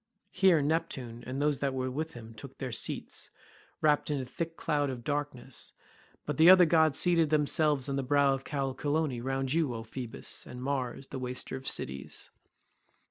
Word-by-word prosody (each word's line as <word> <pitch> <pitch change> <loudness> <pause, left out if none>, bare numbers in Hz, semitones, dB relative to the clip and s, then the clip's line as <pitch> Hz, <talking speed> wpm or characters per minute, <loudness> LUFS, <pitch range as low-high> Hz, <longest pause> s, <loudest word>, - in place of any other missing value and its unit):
Here 185 -6 +4
Neptune 135 -7 -2
and 130 +2 -3
those 145 -1 +1
that 135 -1 -1
were 130 0 -1
with 155 +3 -4
him 115 -1 -10
took 110 - -10
their - - -4
seats, - - -3 0.5
wrapped 150 -1 +3
in 145 -2 0
a 130 - -3
thick 165 +5 -5
cloud 145 -3 0
of 125 -2 -5
darkness; 140 -3 -4 0.5
but 150 -2 -3
the 160 +2 +8
other 185 -1 +9
gods 160 -3 +4
seated 170 -3 +3
themselves 150 -2 +2
on 140 0 -1
the - - +1
brow 140 +1 +3
of 135 0 -4
Callicolone 140 -1 -1
round 135 0 -1
you, 155 -7 +1
O 115 - -5
Phoebus, 115 +1 -5
and 125 - -8
Mars 135 -1 -2
the 135 - -5
waster 125 +1 -4
of 130 0 -7
cities. 70 +1 -3
140 Hz, 180 wpm, -30 LUFS, 130-155 Hz, 0.5 s, other